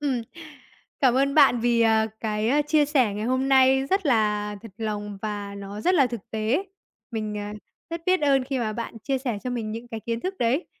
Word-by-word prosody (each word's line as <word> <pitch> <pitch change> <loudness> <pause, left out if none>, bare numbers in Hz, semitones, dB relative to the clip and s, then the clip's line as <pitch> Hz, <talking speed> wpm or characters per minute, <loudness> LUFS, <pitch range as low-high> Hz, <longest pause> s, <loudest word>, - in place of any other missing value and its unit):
Ừm. 265 -5 -1 0.8
Cảm 255 -3 +4
ơn 275 +1 +2
bạn 270 -6 +6
vì, 235 0 +2
ờ, 220 -1 +4
cái, 215 0 -1
a, 295 +3 +3
chia 300 0 +3
sẻ 260 -8 +2
ngày 210 +1 -3
hôm 260 +2 0
nay 265 0 +5
rất 385 -4 +1
là 210 -4 +1
thật 225 - -10
lòng 210 -2 -4
và 205 -1 -4
nó 200 +1 -7
rất 365 +8 +2
là 275 -6 +5
thực 235 -3 -5
tế. 220 - 0 0.5
Mình, 215 -2 -3
à, 205 0 -5 0.4
rất 335 0 -4
biết 370 -1 +3
ơn 270 -3 +3
khi 270 -1 -2
mà 220 -2 -1
bạn 230 0 -6
chia 270 +4 -1
sẻ 245 -5 -3
cho 250 - -2
mình 225 -3 -3
những 230 +2 -7
cái 225 -2 -6
kiến 230 +1 -3
thức 380 +1 -3
đấy. 250 +8 +1
235 Hz, 220 wpm, -25 LUFS, 215-270 Hz, 0.8 s, bạn